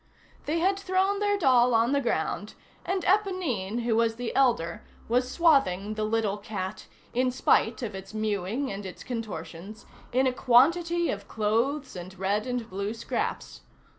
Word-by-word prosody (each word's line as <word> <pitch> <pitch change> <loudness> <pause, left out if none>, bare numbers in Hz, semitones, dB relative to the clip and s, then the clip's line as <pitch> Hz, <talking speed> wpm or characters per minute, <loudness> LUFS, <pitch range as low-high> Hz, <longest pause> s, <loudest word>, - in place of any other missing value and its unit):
They 310 +3 +1
had 385 +4 +2
thrown 390 +1 +1
their 410 0 +1
doll 250 -7 +4
on 230 +3 +3
the 280 0 +2
ground, 240 - -2 0.3
and 375 0 -1
Éponine, 330 - 0
who 230 -1 +1
was 230 0 +2
the 245 0 -5
elder, 225 -8 +2 0.3
was 250 +2 +1
swathing 260 - +3
the 215 0 -2
little 215 -2 0
cat, 200 -1 -5 0.3
in 255 +1 +2
spite 245 -1 +2
of 215 -3 -4
its 190 0 -8
mewing 215 +4 -2
and 200 +1 -5
its 190 -2 -8
contortions, 215 -4 -6 0.3
in 260 +2 +2
a 260 - +2
quantity 335 +8 +3
of 200 - -6
clothes 235 +6 -1
and 185 +1 -8
red 200 +5 0
and 245 -2 -2
blue 200 +3 -4
scraps. 230 - -4
235 Hz, 160 wpm, -27 LUFS, 210-280 Hz, 0.3 s, doll